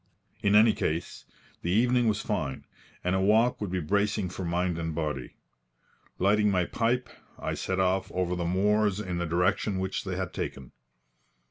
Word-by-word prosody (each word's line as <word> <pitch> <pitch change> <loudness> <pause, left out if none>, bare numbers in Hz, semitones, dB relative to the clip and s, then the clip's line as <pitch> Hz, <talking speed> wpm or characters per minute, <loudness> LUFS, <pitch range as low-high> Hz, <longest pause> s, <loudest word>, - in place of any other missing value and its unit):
In 100 0 +3
any 110 +1 +7
case, 80 +2 -3 0.4
the 85 - -3
evening 120 +5 +3
was 105 -2 +1
fine, 90 -11 -3 0.4
and 90 - +1
a 95 - +2
walk 110 +5 +3
would 105 - -2
be 90 +1 -1
bracing 100 +3 0
for 95 - -6
mind 90 0 -1
and 80 -1 -3
body. 75 -6 -3 0.8
Lighting 105 +2 +3
my 90 -3 +2
pipe, 125 +4 0 0.3
I - - -3
set 95 0 -2
off 95 0 +1
over 90 -1 -1
the 90 - -2
moors 105 +3 +2
in 90 -4 -3
the 85 - -1
direction 90 +4 +1
which 95 0 -2
they 95 -2 -3
had 95 -1 -3
taken. 65 -2 -5
95 Hz, 170 wpm, -28 LUFS, 90-105 Hz, 0.8 s, any